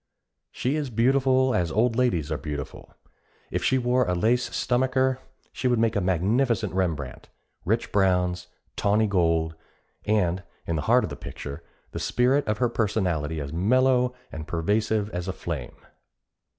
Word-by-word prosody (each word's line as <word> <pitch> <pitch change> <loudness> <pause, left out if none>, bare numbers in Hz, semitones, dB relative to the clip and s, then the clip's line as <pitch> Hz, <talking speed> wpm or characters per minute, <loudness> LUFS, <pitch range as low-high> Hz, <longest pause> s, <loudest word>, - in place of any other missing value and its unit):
She 135 +5 -1
is 145 -3 -2
beautiful 130 +2 +3
as 90 -6 0
old 115 +4 +2
ladies 100 - +1
are 75 - 0
beautiful. 75 -2 -6 0.6
If - - -2
she 130 - +3
wore 125 0 +2
a 90 - +1
lace 115 +7 +1
stomacher, 130 +1 +1 0.3
she 130 - -2
would 120 -1 +2
make 115 0 +1
a 100 - +1
magnificent 100 +7 +1
Rembrandt 80 -9 -2 0.4
rich 110 +5 0
browns, 90 -2 +1 0.3
tawny 105 +2 +2
gold, 85 -5 +1 0.5
and, 95 -4 +1 0.2
in 85 - -1
the - - -1
heart 125 +2 +5
of - - -4
the - - -4
picture, 70 0 -8 0.3
the - - -5
spirit 130 +3 +2
of 105 0 0
her 125 - +2
personality 90 -9 -1
as 70 0 -5
mellow 125 +6 +2 0.2
and 80 0 -7
pervasive 105 +5 0
as 90 +1 -4
a 95 - -2
flame. 75 -9 -5
105 Hz, 155 wpm, -25 LUFS, 85-125 Hz, 0.6 s, heart